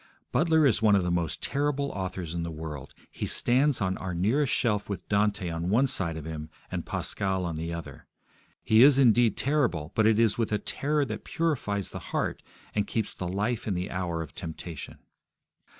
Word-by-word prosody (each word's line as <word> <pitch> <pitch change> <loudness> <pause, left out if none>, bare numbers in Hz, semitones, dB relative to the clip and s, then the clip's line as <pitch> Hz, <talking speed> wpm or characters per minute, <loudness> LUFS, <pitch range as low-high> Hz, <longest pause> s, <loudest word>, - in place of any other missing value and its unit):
Butler 160 -1 +4
is 120 -4 +3
one 105 -2 +5
of 95 - +2
the 90 - 0
most 85 -2 -1
terrible 140 0 0
authors 95 -3 -4
in 85 - -2
the 85 - -3
world. 75 -4 -7 0.2
He - - -4
stands 130 +2 +3
on 95 -1 0
our 90 -2 -4
nearest 120 - +2
shelf 105 -4 +1
with 100 - -5
Dante 100 -2 +1
on 85 +2 -3
one 120 +7 +4
side 90 -11 -1
of 80 - -7
him 80 -1 -6 0.2
and - - -4
Pascal 95 -2 -1
on 85 -2 -3
the 80 +1 -4
other. 85 -1 -7 0.6
He 110 +1 +5
is 135 +1 +8
indeed 120 -4 +4
terrible, 125 - 0
but 110 -1 +3
it 110 -1 +4
is 115 -1 +3
with 115 - 0
a 105 - +2
terror 145 +6 0
that 110 -4 -5
purifies 120 - -1
the - - -6
heart - - -1 0.3
and 105 -1 0
keeps 110 -2 -2
the 90 - -5
life 105 +6 -1
in 100 - 0
the 90 +2 -3
hour 85 -3 -2
of 80 - -12
temptation. 80 -1 -7
100 Hz, 200 wpm, -28 LUFS, 85-120 Hz, 0.6 s, is